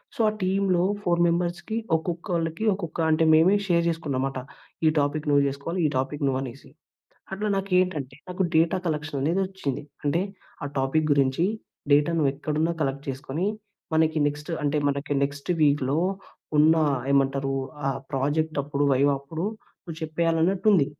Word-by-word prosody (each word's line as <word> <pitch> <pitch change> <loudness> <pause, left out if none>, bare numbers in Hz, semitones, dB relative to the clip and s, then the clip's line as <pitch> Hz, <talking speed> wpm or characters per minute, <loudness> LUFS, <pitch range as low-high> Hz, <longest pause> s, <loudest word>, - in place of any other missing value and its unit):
So - - -16
ఆ - - -2
టీమ్‌లో 185 -1 +2 0.2
four 175 -1 +2
మెంబర్స్‌‌కి 175 +5 -1 0.2
ఒక్కొక్కళ్ళకి 170 +2 -2
ఒక్కొక్క 170 -4 -6
అంటే 160 +1 +3
మేమే 170 +6 +6
షేర్ 170 -1 +3
చేసుకున్నాం 150 -6 -2
మాట. 135 - -5 0.5
"ఈ - - +7
టాపిక్ 145 +2 -1
నువ్వు 140 -1 +4
చేసుకోవాలి", 140 +6 -4
"ఈ - - +5
టాపిక్ 140 +2 -2
నువ్వనేసి." 135 0 -3 0.7
అట్లా 210 +2 -2
నాకు 195 0 -3
ఏంటంటే 150 -8 -1
నాకు 180 +1 -1
డేటా 165 +3 +3
కలెక్షననేది 150 +2 -1
వచ్చింది. 165 -9 -4 0.2
అంటే 160 +5 +2 0.4
ఆ - - -2
టాపిక్ 150 +4 +1
గురించి 140 +3 +2 0.5
డేటా 145 +3 +4
నువ్వెక్కడున్నా 150 +3 0
కలెక్ట్ 140 +1 -3
చేసుకుని, 140 +7 -3 0.5
మనకి 160 0 +3
నెక్టు 150 +3 -3
అంటే 145 +1 +1
మనకి 140 +1 -3
నెక్స్ట్ 140 +3 -2
వీక్‌లో 145 0 +2 0.6
ఉన్న 160 +2 +6 0.4
ఏమంటారు 135 0 +1 0.3
ఆ - - +3 0.2
ప్రాజెక్టప్పుడు 145 0 0
వైవా 140 +2 +3
అప్పుడు, 160 +7 -4 0.4
నువ్వు 165 -2 -7
చెప్పేయాలన్నట్టు 165 +4 0
ఉంది. 150 -8 +4
155 Hz, 140 wpm, -25 LUFS, 140-170 Hz, 0.7 s, ఈ